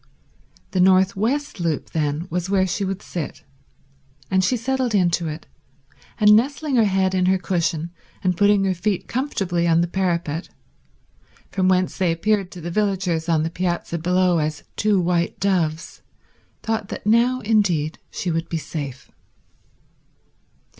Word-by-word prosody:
The 185 - -1
north 185 +1 +4
west 260 +6 -1
loop 165 -4 -2
then 150 +1 -1
was 180 +1 -2
where 195 -1 +3
she 190 +2 -2
would 195 0 -3
sit, 165 -5 -6 0.9
and 190 0 +3
she 250 +7 +2
settled 255 -1 -1
into 175 -3 +2
it, 155 +1 -6 0.7
and 210 -1 +7
nestling 280 +5 +1
her 225 - +5
head 190 -1 +1
in 185 -1 +2
her 190 +1 +4
cushion 170 -2 -1 0.3
and 180 -1 +1
putting 205 +2 +4
her 190 -1 +1
feet 190 +2 -2
comfortably 195 -10 -1
on 165 0 +4
the 170 - +1
parapet, 170 -3 -2 1.0
from 185 -1 +1
whence 185 0 +1
they 180 -3 +2
appeared 195 +3 0
to 180 - -9
the 175 +2 -5
villagers 185 -5 0
on 160 -2 +2
the 165 - -2
piazza 175 -1 -2
below 180 +1 +2
as 150 -1 -2
two 210 -2 +2
white 170 -1 0
doves, 170 -5 -1 0.6
thought 225 -2 -2
that - - -7
now 235 +4 +3
indeed 185 -8 +1
she 180 - -3
would 165 +1 -2
be 165 - -1
safe. 145 -5 -6
185 Hz, 155 wpm, -22 LUFS, 170-205 Hz, 1.0 s, and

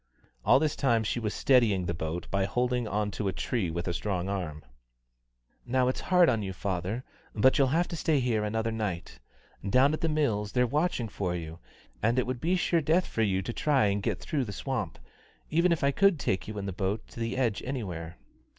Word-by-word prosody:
All - - +6
this 150 +1 +1
time 120 -5 +2
she 110 - -1
was 110 -3 -2
steadying 110 -10 +3
the 85 - -1
boat 80 +1 -4
by 100 -1 +1
holding 125 +1 0
on 105 0 -1
to 100 +1 -3
a - - +1
tree 95 0 -1
with 85 +2 -4
a 85 - 0
strong 95 0 -2
arm. 80 -7 -4 1.0
"Now 125 +1 +1
it's 130 - -2
hard 180 -2 +4
on 115 -6 +2
you, 95 -2 -4
father, 95 +6 -3 0.3
but 130 +7 +4
you'll 135 - +5
have 165 +6 +1
to - - -4
stay 155 -2 +1
here 120 -4 +1
another 110 +2 -1
night. 105 -6 -4 0.4
Down 130 +8 +4
at 155 - -3
The 165 - +1
Mills 115 -10 0
they're 125 0 +3
watching 145 -2 0
for 95 -3 -3
you, 80 -1 -6 0.4
and 115 +4 +2
it 125 - +2
would 125 -1 -4
be 175 +3 +2
sure 175 -2 +2
death 165 +5 +2
for 115 - -3
you 95 -3 +1
to 120 - -4
try 140 -4 +2
and 100 +1 0
get - - -1
through 140 -4 -2
the 100 - -6
swamp, 110 - -3 0.5
even 170 +3 +3
if 165 - +1
I 140 - +4
could 195 +3 +4
take 95 -9 -1
you 110 0 -6
in 100 - -3
the 95 - -3
boat 95 +3 -2
to - - -11
the 115 +2 -2
edge 120 -6 +1
anywhere." 90 -11 -5
115 Hz, 220 wpm, -29 LUFS, 95-135 Hz, 1.0 s, All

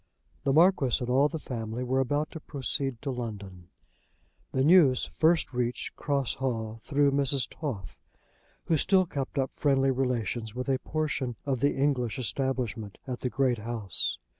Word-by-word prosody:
The 135 - +3
Marquis 155 -4 +4
and 125 0 -2
all 135 +3 +5
the 160 - -4
family 120 -4 -4
were 130 +1 +1
about 145 +3 0
to 160 - -7
proceed 135 -3 -2
to 140 - -1
London. 100 -7 -6 0.8
The 130 - +1
news 150 -5 +6
first 160 -2 +2
reached 125 0 -2
Cross 140 -4 -1
Hall 115 -4 -2
through 145 +1 +2
Mrs. 140 -2 +1
Toff, 110 - -6 0.7
who 160 - +2
still 185 +4 +3
kept 140 -4 -4
up 135 -1 0
friendly 135 -2 +2
relations 120 -3 -1
with 125 +2 -3
a 130 -1 +2
portion 145 -5 -2
of 135 -3 0
the 140 +3 +2
English 135 -4 0
establishment 120 -4 -2
at 125 -2 -4
the 125 - -2
great 125 -3 +1
house. 105 -6 -2
130 Hz, 160 wpm, -28 LUFS, 120-140 Hz, 0.8 s, news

